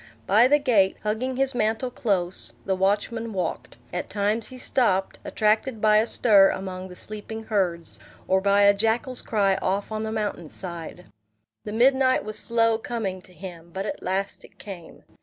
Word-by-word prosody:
By 220 +5 +5
the 290 +3 +5
gate, 220 -9 +2
hugging 225 +5 -1
his 270 +1 +2
mantle 225 +2 0
close, 190 -7 -1
the 190 - +1
watchman 210 +4 0
walked; 160 -11 -4 0.2
at 180 - -3
times 210 +2 0
he 255 - -10
stopped, 195 -7 +1
attracted 215 +3 0
by 215 0 +4
a 220 +2 +3
stir 200 -6 +5
among 185 -1 -5
the 180 - -11
sleeping 215 +3 -7
herds, 180 -6 -1 0.3
or 190 0 +3
by 200 +1 +4
a 200 0 +7
jackal's 225 +5 0
cry 200 -3 +1
off 200 +3 -2
on 215 0 -2
the 220 0 -3
mountain 205 -7 -3
side. 175 -1 -8 0.6
The 210 - -5
midnight 260 +2 +3
was 215 0 -2
slow 230 -1 +2
coming 210 -6 -4
to 185 - -17
him; 175 -2 -10
but 190 +3 -4
at - - -5
last 195 +2 -2
it - - -17
came. 180 -5 -10
210 Hz, 175 wpm, -25 LUFS, 190-225 Hz, 0.6 s, a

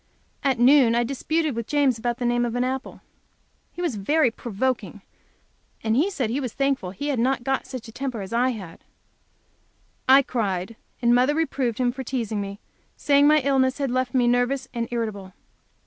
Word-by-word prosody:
At 270 -3 +2
noon 245 -1 +5
I 240 - +3
disputed 295 +3 -1
with 235 -1 -4
James 275 -5 +2
about 240 +1 -2
the 245 - -3
name 240 0 +2
of 240 -1 -2
an 245 - +1
apple. 260 +1 -4 0.7
He 355 - -6
was 295 -11 -1
very 265 +6 +2
provoking, 225 -3 -3 0.8
and 220 0 +1 0.2
said 255 - -2
he 260 - -1
was 255 -5 -4
thankful 275 -9 0
he 285 +11 -5
had 270 -5 0
not 255 +1 +1
got 270 +1 -1
such 255 -3 -7
a - - -10
temper 250 -2 -4
as 195 +3 -7
I 245 +2 +2
had. 195 -9 -7 1.3
I 270 +1 +8
cried, 205 -4 -2 0.3
and 235 0 +5
mother 255 +4 +3
reproved 270 -7 -1
him 250 -1 +1
for 265 +1 -6
teasing 225 -5 -2
me, 200 0 -6 0.4
saying 285 0 +4
my 305 0 +5
illness 260 -1 +2
had 275 -3 -1
left 255 +1 -1
me 245 -2 +3
nervous 245 +2 +1
and 235 -1 -2
irritable. 215 -5 -4
245 Hz, 185 wpm, -24 LUFS, 230-270 Hz, 1.3 s, I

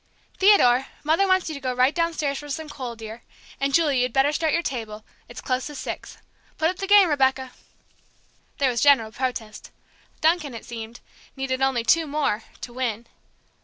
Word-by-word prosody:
Theodore, 270 -11 +5 0.2
Mother 325 +6 +2
wants 375 -1 +2
you 315 - -4
to 280 - -8
go 255 -1 -2
right 255 +3 +3
downstairs 325 -5 -1
for 295 - -10
some 315 +2 -4
coal, 255 -5 -6
dear. 225 +1 -9 0.4
And, 275 0 0
Julie, 285 -4 +3
you'd 250 0 0
better 270 +2 +3
start 315 +1 0
your 340 - +1
table; 220 -6 -5 0.2
it's 240 - -9
close 255 0 -2
to 295 - -9
six. - - -7 0.4
Put 320 +1 +2
up 370 - -11
the 390 - -4
game, 405 -2 +7
Rebecca!" 265 -3 +1 1.1
There 275 -3 +2
was 235 -2 -2
general 270 -7 +4
protest. 235 -4 -5 0.5
Duncan, 315 -5 +1
it 230 - -9
seemed, 230 0 -8 0.3
needed 265 -1 -3
only 265 -3 +1
"two 320 +8 +3
more" 280 -7 -1 0.2
to 240 - -8
win. 240 -3 -3
270 Hz, 180 wpm, -24 LUFS, 245-315 Hz, 1.1 s, game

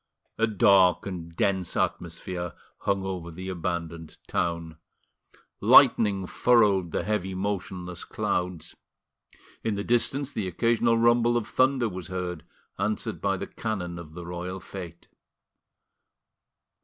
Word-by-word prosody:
A 115 - +4
dark 95 -3 +4
and 90 -4 -5
dense 95 -1 0
atmosphere 85 +1 -2 0.3
hung 100 -1 0
over 90 -3 -4
the 90 +3 -7
abandoned 85 -2 -4
town; 85 -2 -2 0.8
lightning 100 -3 +6
furrowed 100 -5 +3
the - - -1
heavy 95 -1 -1
motionless 95 -2 -4
clouds; 90 -2 -3 0.9
in 110 -2 0
the 100 - -3
distance 135 +4 +1
the 105 -4 -2
occasional 115 +5 +2
rumble 120 +1 +4
of 115 -2 -2
thunder 130 0 +2
was 95 -4 -6
heard, 90 -1 -4 0.4
answered 105 +2 -2
by 100 -1 +1
the - - -4
cannon 90 -6 -4
of 80 -2 -11
the 85 -1 -7
royal 90 +2 -5
fete. 85 -2 -9
95 Hz, 120 wpm, -27 LUFS, 85-110 Hz, 0.9 s, lightning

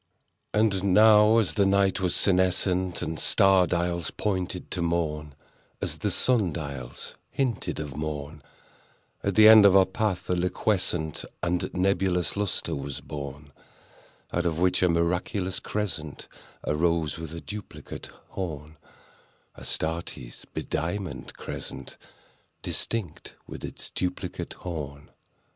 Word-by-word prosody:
And 100 -3 +2
now, 110 0 +7
as 100 -9 +2
the 100 - +3
night 95 -1 +3
was 90 -2 +1
senescent, 95 -1 +2
And 80 - -3
star 95 -2 +5
dials 85 -1 0
pointed 95 -3 -2
to 90 - -1
morn— 75 -4 -1 0.4
As - - -3
the - - 0
star 125 -2 +3
dials 75 - -4
hinted 115 - -2
of 75 -4 -5
morn— 75 0 -5 0.8
At 100 -2 -1
the 110 0 +8
end 110 -1 +10
of 100 -1 +7
our 95 -1 +7
path 95 -1 -2
a - - +1
liquescent 90 -3 0 0.2
And 90 0 0
nebulous 95 -1 +1
lustre 100 -4 -1
was 70 -1 -5
born, 70 0 -8 0.8
Out 85 0 +1
of 80 -2 -1
which 90 +1 +2
a 90 - +4
miraculous 90 +3 0
crescent 85 -8 -4 0.4
Arose 80 0 +1
with 80 -2 -6
a - - -5
duplicate 105 +3 -8 0.2
horn— 80 -4 -6 0.8
Astarte's 80 -6 -3
bediamonded 90 +4 -4
crescent, - - -7 0.7
Distinct 110 -9 -2
with - - -9
its - - -7
duplicate 90 -1 -3
horn. 75 -5 -7
90 Hz, 120 wpm, -27 LUFS, 80-95 Hz, 0.8 s, end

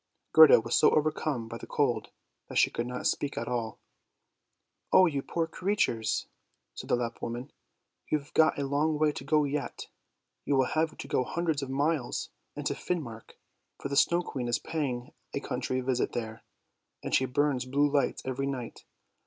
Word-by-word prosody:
Gerda 160 -5 +9
was 115 +1 -4
so - - +6
overcome 150 -5 0
by 115 +1 -7
the - - -9
cold - - 0 0.4
that - - -4
she - - +5
could 120 - -3
not 125 0 -5
speak 145 -1 0
at 115 - -3
all. 120 -3 -2 0.6
" - - -53
Oh 185 - +7
you 145 -5 0
poor 165 +4 -1
creatures! 160 - 0 0.3
" - - -49
said - - -9
the - - +4
Lapp 120 -1 -4
woman; 120 +4 -5 0.3
" - - -35
you've 145 -2 -2
got 160 0 +4
a 140 - -1
long 150 +3 +1
way 155 0 +3
to 140 - -7
go 150 +2 +3
yet; 140 -2 -3 0.5
you 140 - +1
will 130 -1 +4
have 155 +2 0
to - - -7
go 140 -3 +1
hundreds 160 +1 -1
of 135 - -5
miles 140 -1 -1 0.2
into - - -2
Finmark, 130 -11 -5 0.4
for - - -4
the 140 - -2
Snow 170 +5 +4
Queen 130 -7 -4
is 120 - +2
paying 140 -4 -3 0.2
a - - 0
country 130 -1 -2
visit 125 -1 0
there, 110 -2 -4 0.6
and - - -4
she 130 - +4
burns 135 0 +1
blue 140 +3 +2
lights 145 -1 0
every 130 +1 -2
night. 125 -4 -5
140 Hz, 185 wpm, -29 LUFS, 125-155 Hz, 0.6 s, Gerda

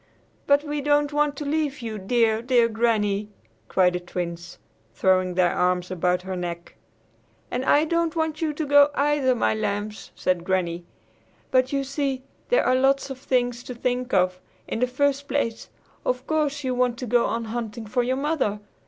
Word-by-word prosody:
"But 285 +1 +4
we 295 -1 -3
don't 290 0 +2
want 295 0 +1
to 295 - -5
leave 290 -3 -1
you, 220 -2 -4
dear, 220 +2 +2
dear 240 -1 +3
Granny!" 215 -3 0 0.4
cried 180 -1 +3
the 180 - -1
Twins, 175 -1 -6 0.4
throwing 185 -1 +2
their 180 -1 +3
arms 180 0 0
about 180 0 0
her 190 0 -4
neck. 175 -1 -5 0.8
"And 250 +1 -1
I 295 +3 +4
don't 335 0 0
want 320 -1 -1
you 315 -2 +1
to 300 +1 -3
go, 285 0 +6
either, 280 -3 +2
my 230 - +1
lambs," 210 0 -3
said 180 -2 0
Granny; 175 -2 -1 0.7
"but, 255 0 +3
you 275 -1 0
see, 275 -1 -2 0.3
there - - +3
are 255 - +3
lots 270 +1 +2
of 260 - -7
things 245 -2 0
to 250 - -8
think 250 +1 -2
of. 185 -1 +2 0.3
In - - -3
the 250 - +2
first 280 +2 0
place, 235 -6 -2 0.3
of - - -1
course 295 -2 0
you 255 -1 -1
want 250 -1 +1
to 250 - -5
go 240 0 +3
on 230 0 -2
hunting 225 0 -5
for 245 +4 0
your 255 +2 0
mother. 275 -8 0
245 Hz, 180 wpm, -24 LUFS, 200-285 Hz, 0.8 s, go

